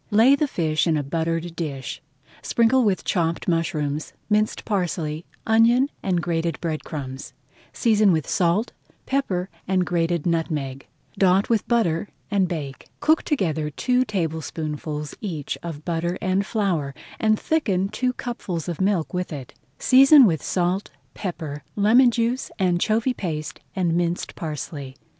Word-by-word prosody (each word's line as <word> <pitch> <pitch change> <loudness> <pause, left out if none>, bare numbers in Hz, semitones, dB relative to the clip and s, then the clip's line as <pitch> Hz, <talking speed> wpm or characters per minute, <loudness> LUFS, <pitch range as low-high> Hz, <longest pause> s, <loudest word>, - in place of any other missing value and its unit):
Lay 225 +5 +6
the 295 +1 0
fish 160 - 0
in 160 -2 +3
a 145 - -1
buttered 165 +3 -2
dish, 140 -7 -4 0.4
sprinkle 240 +2 +3
with 200 -4 +1
chopped 170 -3 0
mushrooms, 155 -3 -1 0.2
minced 215 +1 +1
parsley, 170 -6 -2 0.2
onion, 235 +5 +4
and 180 -3 0
grated 165 -4 -1
bread 160 -3 -3
crumbs, 135 -3 -6 0.4
season 215 -4 +3
with 160 -4 0
salt, 180 +6 +1 0.3
pepper, 195 -10 -1 0.2
and 185 -1 +2
grated 170 -2 0
nutmeg. 155 -6 -2 0.3
Dot 190 +1 +4
with 225 -3 +1
butter 205 -7 +1 0.2
and 195 -2 +3
bake. 145 -6 -5
Cook 315 +1 +3
together 160 - -1
two 250 - +1
tablespoonfuls 155 - -3
each 165 -9 -3
of 155 -3 -7
butter 170 +1 -1
and 190 +2 0
flour, 175 - -1 0.2
and 215 -1 +3
thicken 200 - +1
two 250 +5 -1
cupfuls 190 -10 -4
of 175 0 -3
milk 190 -4 +1
with 180 0 -2
it. 135 -5 -7 0.2
Season 270 +1 +7
with 165 -7 +1
salt, 180 +2 0 0.2
pepper, 160 -7 -5
lemon 230 +5 +6
juice, 235 +2 -1
anchovy 215 +7 +1
paste, 165 -5 -4 0.2
and 175 -3 +1
minced 175 0 -1
parsley. 145 -3 -6
175 Hz, 140 wpm, -23 LUFS, 160-215 Hz, 0.4 s, Season